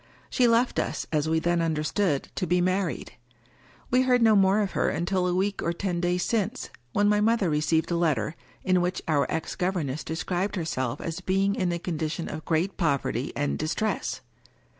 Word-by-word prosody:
She 250 - +3
left 235 +2 +2
us, - - -2
as 155 0 +1
we 160 - +2
then 170 +1 +1
understood, 155 0 0
to 185 - -2
be 180 +2 +2
married. 185 -1 -1 0.8
We 250 +1 +4
heard 250 -2 +3
no 220 -1 +6
more 195 +1 +4
of 200 -3 -1
her - - +1
until 180 +3 0
a 180 - 0
week 195 +2 0
or 170 - 0
ten 175 -1 -2
days 180 0 +1
since, 225 +2 -1 0.2
when 205 +8 +2
my 210 0 +3
mother 215 -5 +2
received 155 +3 +1
a - - +2
letter, 165 -2 0 0.3
in 185 -1 +3
which 180 +1 -2
our 145 -3 +1
ex 160 - -3
gov 180 +1 0
erness 150 -5 -3
described 175 +5 -2
herself 130 -9 -2
as 165 -1 -4
being 195 +1 +1
in 185 -3 0
a 170 - -1
condition 165 -1 -3
of 155 0 -6
great 170 +4 0
poverty 140 - 0
and 145 0 -1
distress. 155 - -2
175 Hz, 190 wpm, -26 LUFS, 160-195 Hz, 0.8 s, no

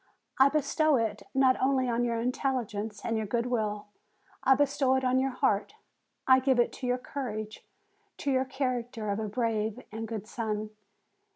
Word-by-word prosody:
I 270 +1 +7
bestow 305 +1 +2
it 220 -4 -1
not 265 -1 +4
only 260 -1 +2
on 240 0 +1
your 235 -1 0
intelligence 230 -4 -2
and 230 -1 0
your 220 -1 -2
good 235 +3 0
will; 215 -4 -1 0.6
I 265 - +6
bestow 270 -1 +2
it 260 - 0
on 255 0 +3
your 270 +1 +1
heart, 250 - 0 0.5
I 260 0 +6
give 260 -1 +2
it 240 - +2
to 255 - -5
your 250 0 +2
courage, 215 -5 -5 0.5
to 280 - -1
your 260 0 +2
character 245 -5 -2
of 200 - -1
a 215 -1 -3
brave 220 0 -1
and 220 +1 -5
good 220 -3 -5
son. 215 -2 -3
245 Hz, 175 wpm, -29 LUFS, 215-260 Hz, 0.6 s, I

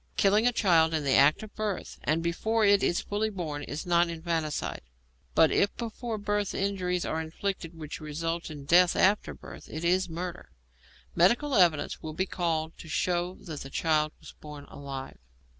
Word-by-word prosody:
Killing 210 +4 +4
a - - +4
child 165 -8 +3
in 155 - -1
the 140 -1 +2
act 145 +8 +5
of 215 - -10
birth 215 -3 -4
and 160 +3 +1
before 220 +6 +1
it 200 0 +5
is 175 - +1
fully 210 +2 -1
born 165 -7 -4
is 145 +1 -5
not 175 -1 +3
infanticide, 165 -2 -2 0.5
but - - +6
if 200 - +1
before 230 -1 -4
birth 205 -1 -1
injuries 185 -3 -1
are 160 - -1
inflicted 165 +1 -4
which 155 0 -7
result 165 +3 -3
in 145 -3 -8
death 175 +3 +5
after 200 +2 +2
birth, - - -12
it 160 +2 -5
is 185 +1 +2
murder. 175 +1 -6 0.7
Medical 235 +12 +3
evidence 175 - +3
will 155 - -6
be 190 +4 0
called 165 -3 -2
to 160 - -10
show 175 +2 0
that 155 -5 -7
the 135 - -8
child 155 +1 +1
was - - -12
born 150 -1 -9
alive. 135 -2 -7
170 Hz, 175 wpm, -28 LUFS, 155-195 Hz, 0.7 s, but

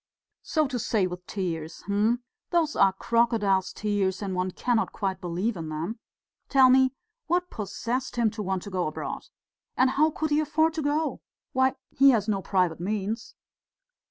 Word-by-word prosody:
"So 310 -2 +1
to 255 -2 -3
say, 210 -3 +1
with 180 0 -6
tears! 165 -4 -4
Hm! 215 +5 +1 0.3
Those 330 -3 +1
are 195 -1 +5
crocodile's 210 -2 +1
tears 205 -2 -1
and 195 -2 -3
one 185 0 0
cannot 230 +4 0
quite 190 -2 -3
believe 180 +6 -1
in 165 -3 -5
them. 165 +9 -4 0.5
Tell 265 -2 +6
me, 260 0 +4 0.3
what 355 +2 0
possessed 235 +5 -3
him 235 -3 +2
to 215 - -5
want 190 -2 -2
to 200 - -8
go 180 -3 0
abroad? 155 - -5 0.5
And 255 0 +4
how 305 +4 +3
could 315 0 -3
he 295 - +4
afford 315 +1 +2
to 320 - -2
go? 300 +2 -1 0.3
Why, 260 0 +3 0.2
he 275 +1 +6
has 225 -5 +3
no 200 -3 0
private 180 -4 +1
means!" 210 +4 -3
215 Hz, 170 wpm, -27 LUFS, 190-260 Hz, 0.5 s, Tell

